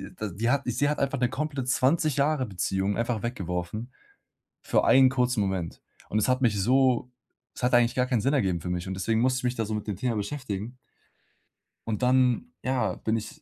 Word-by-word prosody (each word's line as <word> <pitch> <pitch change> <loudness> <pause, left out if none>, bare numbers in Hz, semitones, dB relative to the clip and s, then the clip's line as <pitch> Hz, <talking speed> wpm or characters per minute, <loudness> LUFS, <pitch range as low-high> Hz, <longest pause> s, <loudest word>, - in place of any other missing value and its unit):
da 110 - -4
die 105 +6 -2
hat 140 +2 +2
sie 125 +4 +1
hat 150 - -1
einfach 140 0 0
'ne 125 -1 +2
komplett 140 -1 -3
20 140 +4 +2
Jahre-Beziehung 105 -9 0
einfach 115 -2 -1
weggeworfen 105 +1 -4 0.7
für - - +1
einen 130 0 +6
kurzen 125 -2 +1
Moment. 95 -4 -2 0.3
Und 105 - +1
es 110 - +1
hat 130 +1 +1
mich 110 -5 +2
so 125 +2 +2 0.4
es - - -10
hat 125 - +2
eigentlich 120 -1 +4
gar 125 - +2
keinen 125 -3 +1
Sinn 135 +7 +1
ergeben 95 -11 +1
für 90 - -6
mich, 90 0 -3
und 95 - -4
deswegen 110 +4 0
musste 130 +1 +2
ich - - -12
mich 125 0 0
da 115 - -1
so 110 - -5
mit 105 - -4
dem 105 -3 -3
Thema 120 +4 -1
beschäftigen. 110 0 -4 1.1
Und 110 -2 -2
dann, 130 - +2
ja, 125 -8 0
bin 110 - -1
ich, 150 +8 -8
120 Hz, 205 wpm, -27 LUFS, 105-130 Hz, 1.1 s, einen